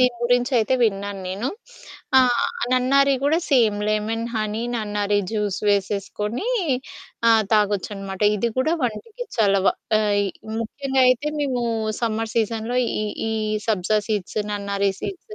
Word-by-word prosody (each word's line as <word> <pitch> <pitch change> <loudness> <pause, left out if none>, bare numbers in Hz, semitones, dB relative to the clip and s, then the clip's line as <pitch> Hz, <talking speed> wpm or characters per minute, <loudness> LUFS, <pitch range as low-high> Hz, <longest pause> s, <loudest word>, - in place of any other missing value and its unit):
దీని 250 -1 +4
గురించయితే 245 0 +2
విన్నాను. 200 -2 0
నేను 205 +8 -2 0.7
ఆ! - - +8 0.5
నన్నారి 275 +2 +4
గూడా 295 +4 +3
సేమ్ 225 -6 +4
లెమన్, 215 +2 -1
హనీ, 215 +1 -2
నన్నారి 205 -2 0
జ్యూస్ 210 -3 -1
వేసేసుకొని 205 - -1 0.8
ఆ! - - +7 0.2
తాగొచ్చనమాట. 200 -2 0 0.2
ఇది 235 +3 0
గూడా 315 +6 +2
వంటికి 425 - -4
చలవ. 200 -3 +3 0.3
ఆహ్, 210 -1 +1
ఇ - - -1 0.3
ముఖ్యంగా 265 +3 0
అయితే 255 +4 +2
మేము 260 -4 0 0.4
సమ్మర్ 225 -1 -1
సీజన్‌లో 225 +2 0 0.2
ఈ, - - -1 0.3
ఈ - - -1 0.4
సబ్జా 210 0 +2
సీడ్స్, 210 -2 -2
నన్నారి 200 -1 0
సీడ్స్, 425 +3 -7
220 Hz, 125 wpm, -22 LUFS, 205-250 Hz, 0.8 s, ఆ